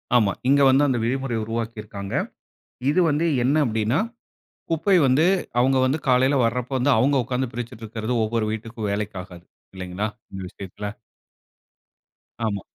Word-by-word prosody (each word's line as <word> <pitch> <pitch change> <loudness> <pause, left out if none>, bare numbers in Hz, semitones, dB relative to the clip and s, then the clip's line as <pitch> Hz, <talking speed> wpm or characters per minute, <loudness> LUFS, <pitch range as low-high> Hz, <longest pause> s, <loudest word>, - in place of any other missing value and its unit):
ஆமா. 105 -5 +4 0.2
இங்க 140 0 +5
வந்து 135 +2 +5
அந்த 130 -3 +1
விதிமுறைய 125 -1 -1
உருவாக்கிருக்காங்க. 110 -3 -5 0.8
இது 155 +5 +3
வந்து 150 +3 +1 0.2
என்ன 140 +4 +2
அப்படின்னா, 110 +4 +1 0.7
குப்பை 165 +4 +3
வந்து 135 +5 +4 0.3
அவங்க 130 +2 +3
வந்து 140 +5 +1
காலையில 130 +2 +4
வரப்போ 125 +3 -1
வந்து, 135 +3 +3
அவங்க 140 +2 +3
உட்கார்ந்து 125 0 -2
பிரிச்சிட்டுருக்கறது, 115 -1 -4
ஒவ்வொரு 110 0 -1
வீட்டுக்கும் 110 0 -5
வேலைக்கு 100 -1 -3
ஆகாது. 90 -2 -13 0.3
இல்லைங்களா, 95 +3 -3 0.2
இந்த 95 - -6
விஷயத்துல? 100 +2 -7 1.6
ஆமா. 100 -3 -1
115 Hz, 130 wpm, -23 LUFS, 105-135 Hz, 1.6 s, இங்க